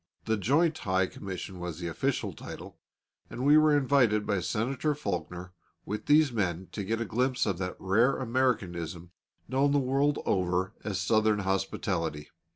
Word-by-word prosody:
The 110 - +1
Joint 150 - +2
High 95 -1 +1
Commission 95 0 -7
was 90 -3 -5
the 85 - -6
official 80 - -1
title, - - -10 0.5
and 125 - -4
we 145 +1 +7
were 155 -1 +5
invited 125 -7 +3
by 100 -2 0
Senator 130 - -1
Faulkner 90 - -4 0.3
with 105 +1 -5
these 150 -1 +5
men 95 -5 -2
to 100 - -4
get 110 +4 -1
a 115 - -1
glimpse 125 +4 0
of 95 -4 -1
that 90 -1 -3
rare 110 +8 +2
Americanism 95 -10 -1 0.4
known 140 +2 +2
the - - +4
world 140 +2 +1
over 95 +1 0
as 100 -3 -2
Southern 110 +1 +2
hospitality. 95 -5 -2
105 Hz, 160 wpm, -29 LUFS, 90-130 Hz, 0.5 s, we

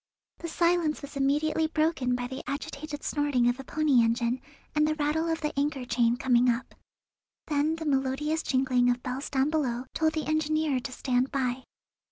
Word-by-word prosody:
The 335 - -5
silence 335 -2 +1
was 285 +1 -9
immediately 300 +3 +1
broken 310 -6 +1
by 245 0 -3
the 260 +1 -6
agitated 290 +1 -5
snorting 290 -5 +1
of 245 +2 +1
a - - -6
pony 290 -3 +3
engine, 235 +2 0 0.3
and 300 0 +3
the 310 - 0
rattle 310 +2 0
of 325 0 -1
the 300 -1 -2
anchor 280 -3 -1
chain 235 0 +2
coming 250 -2 +3
up. 240 +1 -2 0.7
Then 300 +1 +1
the 325 0 -6
melodious 285 +3 0
jingling 255 -2 +2
of 245 0 0
bells 255 +2 -4
down 275 +2 +1
below 255 -6 -1
told 315 0 +1
the 315 - -2
engineer 310 -2 +1
to 250 - -6
"stand 255 0 0
by." 260 -1 -1
280 Hz, 180 wpm, -28 LUFS, 250-310 Hz, 0.7 s, pony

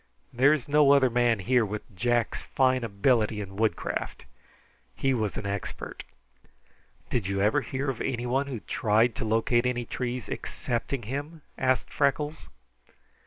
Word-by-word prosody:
There 135 +4 +5
is 155 -5 0
no 145 -1 +5
other 130 -3 +4
man 120 -1 +3
here 120 +5 +2
with 105 -1 -6
Jack's 120 +3 0
fine 130 -2 +1
ability 110 0 +1
in 95 -2 -7
woodcraft. 110 -3 -2 0.7
He 135 0 +1
was 110 -5 -1
an - - -4
expert." 100 -1 -5 1.1
"Did 115 -7 0
you 100 0 -1
ever 105 +9 +3
hear 135 +1 -3
of 135 -4 -2
anyone 125 +3 -1
who 135 - -4
ever 110 - -8
tried 115 0 +2
to 115 - -2
locate 115 +2 +2
any 120 -1 -1
trees 125 0 -4
excepting 120 +1 -3
him?" 145 +7 -5
asked 130 -1 0
Freckles. 145 +2 0
120 Hz, 150 wpm, -27 LUFS, 110-135 Hz, 1.1 s, There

